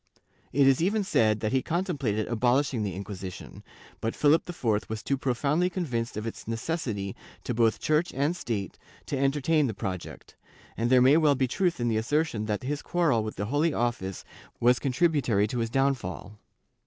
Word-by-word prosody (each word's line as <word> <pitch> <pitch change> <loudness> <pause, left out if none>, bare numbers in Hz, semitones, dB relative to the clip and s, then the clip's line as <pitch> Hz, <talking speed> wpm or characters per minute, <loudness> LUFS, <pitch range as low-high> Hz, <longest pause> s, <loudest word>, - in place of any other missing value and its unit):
It 140 +1 +4
is 135 +2 +4
even 205 +4 +1
said 110 - +2
that 110 - -1
he 130 0 +2
contemplated 140 - -1
abolishing 125 +2 +1
the 100 -4 -3
Inquisition, 95 -2 -8 0.4
but 115 - -2
Philip 150 +4 +3
IV 115 -11 -1
was 110 -1 -4
too 140 - 0
profoundly 140 +7 0
convinced 125 - -3
of 110 - -4
its 115 - -7
necessity 115 - -3 0.3
to - - -2
both 115 -1 +2
Church 155 +3 +1
and 145 +6 +1
State 110 - -4 0.3
to - - -3
entertain 140 +2 +2
the 110 - -4
project, 95 -2 -6 0.4
and 115 +1 0
there 125 -1 +6
may 135 +4 +6
well 150 -3 +4
be 130 0 +1
truth 175 +5 0
in 120 - 0
the 110 -2 +1
assertion 120 -2 0
that 105 +1 -2
his 145 +3 -2
quarrel 160 -11 +1
with 110 - -5
the 100 - -3
Holy 145 +7 +1
Office 115 -6 -2 0.3
was 120 +1 +4
contributory 135 - +2
to 120 +3 -3
his 115 -1 -1
downfall. 120 -6 -1
125 Hz, 180 wpm, -27 LUFS, 110-150 Hz, 0.4 s, there